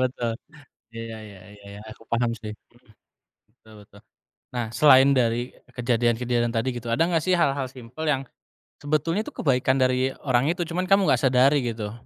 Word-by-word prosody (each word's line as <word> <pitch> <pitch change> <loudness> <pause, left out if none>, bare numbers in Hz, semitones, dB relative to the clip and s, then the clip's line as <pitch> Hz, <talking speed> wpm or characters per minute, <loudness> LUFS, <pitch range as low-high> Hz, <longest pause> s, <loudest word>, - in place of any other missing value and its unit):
betul. 125 -2 -1 0.6
Iya 115 - -5 0.2
iya 100 -3 -13
iya 100 -1 -17
iya. 100 0 -10
Aku 115 - -15
paham 115 0 +1
sih. 105 -1 -6 0.8
Mhm. - - -70
Betul 110 - -18
betul. 100 0 -19 0.5
Nah 120 -2 -2
selain 135 0 +6
dari 120 -2 +1 0.4
kejadian-kejadian 120 0 0
tadi, 115 +3 0
gitu, 120 0 -7
ada 115 - +2
nggak 165 -3 0
sih 185 +3 +1
hal-hal 140 -5 +1
simpel, 125 +4 -9
yang 135 -2 0 0.6
sebetulnya 155 +6 -1
tuh - - -9
kebaikan 130 -2 +2
dari 130 +1 +1
orang 130 -1 +1
itu, 175 0 -2
cuman 180 +2 -2
kamu 195 +1 +4
nggak - - +3
sadari, 130 +2 +4
gitu? 110 -3 -4
125 Hz, 170 wpm, -24 LUFS, 115-140 Hz, 0.8 s, selain